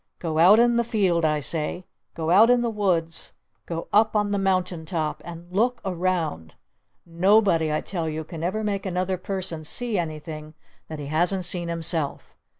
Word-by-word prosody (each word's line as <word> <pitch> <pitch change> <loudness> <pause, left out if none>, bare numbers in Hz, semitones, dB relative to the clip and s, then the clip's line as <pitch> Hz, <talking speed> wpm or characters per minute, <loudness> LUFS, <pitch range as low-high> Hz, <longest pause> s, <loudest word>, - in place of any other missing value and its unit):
Go 160 -2 -2
out 190 +6 +7
in 240 0 +4
the 235 - +3
field 190 -8 +1
I 150 -1 +1
say! 160 +5 -2 0.3
Go 160 0 -2
out 215 +6 +7
in 245 -1 +4
the 235 -1 -1
woods! 175 -6 -1 0.3
Go 165 -1 -4
up 215 +1 +4
on 205 -1 +1
the 200 - 0
mountain 185 -3 0
top! 160 -2 -3
And 170 0 -9
look 235 +6 +1
around! 175 - -2 0.5
Nobody 175 -2 +3
I 155 - 0
tell 170 -4 -3
you 155 +1 -4
can 165 0 -8
ever 215 +5 -1
make 200 -2 -2
another 185 0 -1
person 185 -4 -4
see 225 +5 -1
anything 155 -1 -6 0.3
that 155 - -7
he 145 - -6
hasn't 175 +5 +1
seen 175 -1 +1
himself! 165 -3 -2
175 Hz, 175 wpm, -24 LUFS, 160-200 Hz, 0.5 s, out